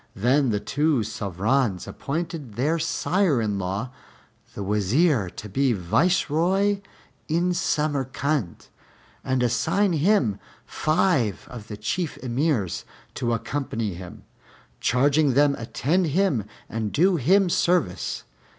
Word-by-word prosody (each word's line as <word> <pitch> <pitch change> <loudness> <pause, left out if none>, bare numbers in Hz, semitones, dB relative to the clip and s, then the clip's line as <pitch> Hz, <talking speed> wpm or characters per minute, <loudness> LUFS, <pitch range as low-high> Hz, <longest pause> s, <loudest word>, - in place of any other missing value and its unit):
Then 130 +5 +2
the 105 -2 0
two 145 0 +1
Sovrans 105 +1 -1
appointed 155 - -5
their 150 +8 +1
sire 180 -3 +1
in 105 -3 -1
law 100 +7 -3 0.6
the 100 - -4
Wazir 105 - +2
to 105 - -9
be 130 +5 +1
Viceroy 180 - +1 0.5
in 175 +3 +1
Samarcand, 140 - -1 0.5
and 130 -1 0
assigned 170 - +1
him 150 - +2 0.3
five 155 - +1
of 115 -4 -9
the 105 - -7
Chief 155 - -2
Emirs 125 - 0 0.3
to 120 - -2
accompany 115 -4 -2
him, 90 0 -10 0.6
charging 140 +2 +2
them 145 0 +4
attend 155 +10 0
him 150 - +1 0.2
and 110 -2 -3
do 180 +3 +3
him 185 +8 +4
service. 175 - 0
135 Hz, 115 wpm, -24 LUFS, 110-165 Hz, 0.6 s, them